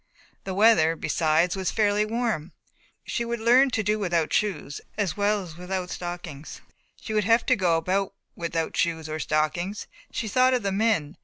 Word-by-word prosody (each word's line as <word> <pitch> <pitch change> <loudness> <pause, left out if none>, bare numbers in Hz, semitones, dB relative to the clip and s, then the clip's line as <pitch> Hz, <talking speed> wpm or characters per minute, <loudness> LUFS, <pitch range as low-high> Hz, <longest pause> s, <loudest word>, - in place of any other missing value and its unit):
The 190 - -4
weather, 195 -6 +5
besides, 165 +2 +1
was 190 -1 -1
fairly 210 -1 +2
warm. 220 -8 -2 0.5
She 235 - -2
would 235 0 -3
learn 245 +4 +5
to 220 -3 -1
do 210 +1 0
without 170 -5 0
shoes 150 -9 -1 0.2
as 195 -7 -1
well 205 0 +1
as 165 -3 -11
without 180 0 -4
stockings. 175 -4 -7 0.4
She 220 - -6
would 210 -1 +1
have 230 +1 +3
to - - +4
go 175 -4 +2
about 190 +4 -1 0.2
without 165 -1 -3
shoes 160 -2 0
or 155 0 -4
stockings. 170 +7 -1 0.3
She 225 - -3
thought 255 +4 +3
of 245 - -2
the 195 - 0
men. 195 -6 0
190 Hz, 175 wpm, -25 LUFS, 165-215 Hz, 0.5 s, weather